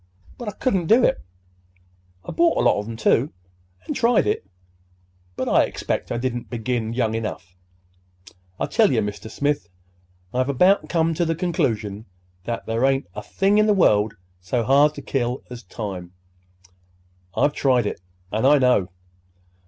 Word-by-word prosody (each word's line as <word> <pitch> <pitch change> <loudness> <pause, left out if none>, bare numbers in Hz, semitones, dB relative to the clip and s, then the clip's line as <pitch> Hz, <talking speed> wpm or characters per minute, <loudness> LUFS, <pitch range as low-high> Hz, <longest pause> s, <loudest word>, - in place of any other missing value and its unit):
But 240 - -7
I 210 - -3
couldn't 190 -10 0
do 235 +6 +5
it. 265 - +2 1.0
I - - -5
bought 335 -1 +2
a - - +2
lot - - +3
of 105 - -6
'em, 115 - -6
too, 115 +5 +2 0.6
an' - - -2
tried 235 - +3
it; 105 - -1 0.9
but - - -3
I - - +4
expect - - -4
I 120 - -1
didn't 120 -1 -3
begin 115 -1 -2
young 115 -3 0
enough. 105 -5 -5 1.0
I - - 0
tell 220 -2 +3
ye, 125 - +1
Mr. 105 0 -3
Smith, 145 -4 -1 0.6
I've 130 +2 0
about 180 +9 +3
come 165 -1 +1
to 175 - 0
the 165 -1 0
conclusion 110 - -2 0.4
that 120 -1 -4
there 115 +2 -1
ain't 135 +1 +2
a - - -6
thing 200 +2 +1
in 215 - +4
the 210 - +4
world 105 - +3 0.2
so 95 +7 -1
hard 140 +5 +4
to 140 - -8
kill 125 -1 -2
as 120 -1 -7
time. 95 -7 -7 1.2
I've 145 - +3
tried 125 -6 +2
it, 105 - -4 0.3
and 110 +5 +1
I 145 +1 +6
know. 125 -8 +3
125 Hz, 165 wpm, -22 LUFS, 110-165 Hz, 1.2 s, I